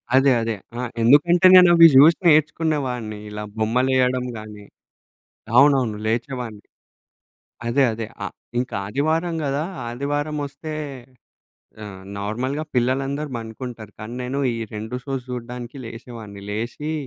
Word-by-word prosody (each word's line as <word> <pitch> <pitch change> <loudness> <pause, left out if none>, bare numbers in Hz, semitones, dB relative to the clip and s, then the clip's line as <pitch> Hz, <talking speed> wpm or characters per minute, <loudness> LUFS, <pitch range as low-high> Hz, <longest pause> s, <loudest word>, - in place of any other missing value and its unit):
అదె. 135 0 +5
అదె. 115 -1 -2 0.2
ఆహ్, 125 -2 -3
ఎందుకంటే 170 +9 +5
నేనవి 175 -2 +9
జూసి 155 +5 +8
నేర్చుకునేవాడ్ని 145 -8 +1
ఇలా 105 0 -6
బొమ్మలేయడం 125 +2 +1
గాని 105 -1 -10 0.9
అవునవును 130 -6 +4
లేచేవాడ్ని. 120 -1 -3 1.0
అదె. 135 +4 +2
అదె 110 0 -4 0.2
అ - - -1 0.3
ఇంక 125 +1 -2 0.2
ఆదివారం 160 - 0
గదా 140 +3 -1 0.2
ఆదివారం 145 +5 -2
వస్తే 155 +2 -8 1.1
ఆహ్, 95 -2 -9 0.2
నార్మల్‌గా 125 +9 -2
పిల్లలందరు 135 +4 0
పండుకుంటారు. 115 -1 -8
కానీ 110 +3 -7
నేను 130 +3 -3
ఈ - - -4 0.2
2 110 +4 -5
షోస్ 135 -3 -4
చూడ్డానికి 125 +1 -7
లేసేవాడిని, 115 -3 -9
లేషి 120 +8 -4
125 Hz, 110 wpm, -22 LUFS, 115-145 Hz, 1.1 s, నేనవి